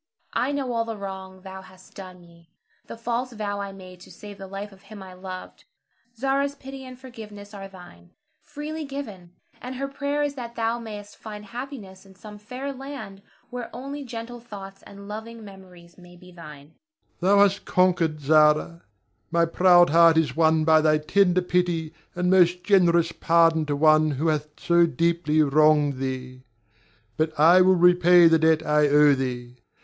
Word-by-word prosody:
I 260 - 0
know 275 -3 -3
all 230 -1 0
the 225 -1 -6
wrong 190 -1 -9
thou 190 -1 -9
hast 185 0 -18
done 185 -2 -11
me, 170 -1 -21 0.4
the - - -9
false 240 +2 -3
vow 205 -2 -4
I 200 0 -6
made 185 -2 -13
to - - -15
save 205 -1 -12
the 195 - -9
life 200 +2 -7
of 195 -1 -18
him 200 0 -12
I 185 -1 -12
loved. 185 0 -10 0.5
Zara's 275 +3 -1
pity 270 -1 -10
and 255 -1 -11
forgiveness 215 -5 -12
are 195 -1 -8
thine, 180 - -16 0.3
freely 310 +2 -7
given; 215 - -8 0.3
and 255 +1 -7
her 275 +2 -4
prayer 280 +1 -2
is 290 -1 -2
that 240 -3 -8
thou 230 +1 -1
mayst 210 -3 -10
find 210 -1 -10
happiness 230 -4 -9
in 195 -1 -19
some 210 +2 -12
fair 255 +6 -7
land 255 -8 -9 0.3
where 245 -1 -6
only 275 +3 -7
gentle 240 -1 -8
thoughts 195 -4 -11
and 200 0 -13
loving 220 +1 -8
memories 185 -3 -15
may 175 0 -16
be 180 +1 -16
thine. 150 -4 -13 0.5
Ber. 180 - -2
Thou - - +4
hast 200 0 0
conquered, 175 -4 +1
Zara; 155 +3 +3 0.5
my 170 0 +2
proud 175 0 +4
heart 165 0 +5
is 150 -6 +1
won 160 -1 +2
by 160 0 +5
thy 155 0 +3
tender 180 +4 +2
pity 175 -3 -1 0.2
and 180 0 -1
most 180 -1 +3
generous 170 -3 +3
pardon 165 -2 +2
to 145 - -1
one 155 +1 +4
who 150 +3 -1
hath 150 -1 -1
so 170 0 +3
deeply 165 -2 +1
wronged 150 -1 +3
thee. 130 -1 -6 0.8
But 155 -1 -2
I 170 +4 +6
will 185 +1 +4
repay 175 0 +5
the 165 0 +4
debt 160 0 +2
I 150 0 +3
owe 145 0 +5
thee. 125 -2 -5
185 Hz, 175 wpm, -24 LUFS, 165-220 Hz, 0.8 s, I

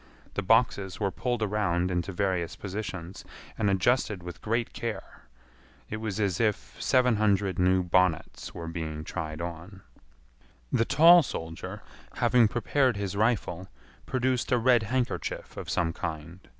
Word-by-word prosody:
The - - -1
boxes 100 -2 +2
were 100 -2 0
pulled 120 0 -2
around 95 -4 0
into 90 +2 -1
various 90 -3 -1
positions, 95 -3 -6 0.3
and 105 -2 +1
adjusted 100 0 +1
with 90 -2 -8
great 115 +2 -1
care. 115 -2 -6 0.7
It 110 - -2
was 110 -2 -4
as 100 -4 0
if 105 -3 -1
seven 125 -3 +3
hundred 100 -3 +1
new 90 0 +3
bonnets 90 -1 0
were 85 - -7
being 80 -2 -4
tried 80 -1 -5
on. 85 +3 -7 0.9
The 115 - +2
tall 170 +6 +7
soldier, 80 - -6 0.3
having 120 -3 +4
prepared 125 +1 +1
his 100 -1 -3
rifle, 100 -4 0 0.4
produced 130 0 0
a 125 - +4
red 120 0 +4
handkerchief 130 -1 -2
of - - -7
some 85 -1 0
kind. 80 +3 -6
100 Hz, 140 wpm, -28 LUFS, 90-115 Hz, 0.9 s, tall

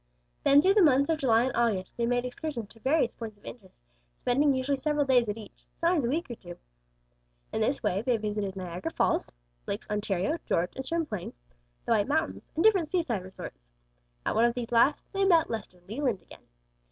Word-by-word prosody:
Then 285 +1 +6
through 385 - +5
the 415 - +5
months 280 -2 +4
of 315 - 0
July 235 -5 +4
and 260 - -2
August, 215 -6 0
they 235 -1 0
made 245 0 +1
excursions 250 -4 -5
to 225 - -17
various 265 0 +2
points 220 -3 -8
of 205 - -23
interest, 200 -6 -11 0.4
spending 280 +4 +2
usually 270 +1 0
several 295 +1 +1
days 250 -4 +3
at 205 - -2
each; 215 -3 -13
sometimes 335 -3 +2
a - - 0
week 320 +5 -1
or 245 - -5
two. 175 -6 -10 1.0
In - - -1
this - - 0
way 190 +3 +1
they 240 0 +1
visited 210 -2 -3
Niagara 180 -2 -4
Falls, - - 0 0.4
Lakes - - -4
Ontario, 210 - -1
George 175 +2 0
and 265 - -6
Champlain, 300 - -3 0.5
the - - -2
White 210 -3 +3
Mountains, 315 +3 -1
and 325 - +1
different 380 -8 +4
seaside 320 - 0
resorts. 180 - -10 0.6
At - - +1
one 230 - +4
of 240 0 +1
these 245 0 -4
last, 240 +5 +3
they 390 0 +1
met 340 -8 +4
Lester 205 -5 -6
Leland 230 -3 -2
again. - - -16
245 Hz, 200 wpm, -28 LUFS, 210-295 Hz, 1.0 s, Then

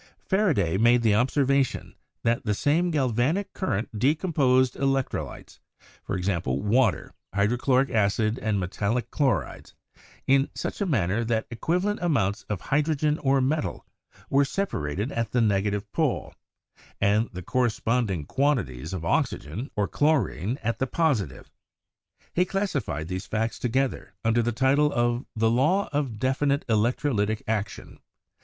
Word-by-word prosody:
Faraday 155 - +2
made 120 +1 +4
the 110 -2 +4
observation 135 +4 +1 0.3
that 115 0 +1
the 105 -2 0
same 160 - +2
galvanic 150 - 0
current 110 - -3
decomposed 130 - +2
electrolytes—^., 100 -8 -3
water, 120 +5 +1 0.2
hydrochloric 125 +6 +2
acid 110 +2 +1
and 110 -3 0
metallic 100 +6 -2
chlorides 120 - -1 0.3
— - - -24 0.2
in 135 +1 +3
such - - -4
a 200 - +1
manner 110 - +1
that 110 -1 -1
equiva 165 +10 -1
lent 205 +1 -1
amounts 115 - +1
of 105 -4 -3
hydrogen 150 +1 +1
or 135 -1 +2
metal 150 +4 -1 0.4
were 140 +1 +3
separated 110 - -2
at 115 -2 -3
the 125 - +3
negative 105 -2 +1
pole, - - -1 0.7
and 105 +3 +2
the 90 0 -7
corresponding 115 - 0
quantities 95 - -1
of 85 -3 -4
oxygen 90 - -1
or 105 -2 +1
chlorine 130 - +1
at 115 +1 -1
the 130 - 0
positive. 125 - -1 0.8
He 180 - +3
classified 150 - -2
those 95 +2 -5
facts 115 +1 -2
to 125 - -1
gether 130 +2 -1
under 115 +1 +3
the 120 +1 0
title 140 +5 +3
of 120 0 0
"The 110 0 +2
Law 155 +12 +2
of 140 -6 -1
definite 140 +4 0
Electro 120 +5 +1
lytic 105 0 0
Action." 105 -2 -3
120 Hz, 135 wpm, -26 LUFS, 105-140 Hz, 0.8 s, made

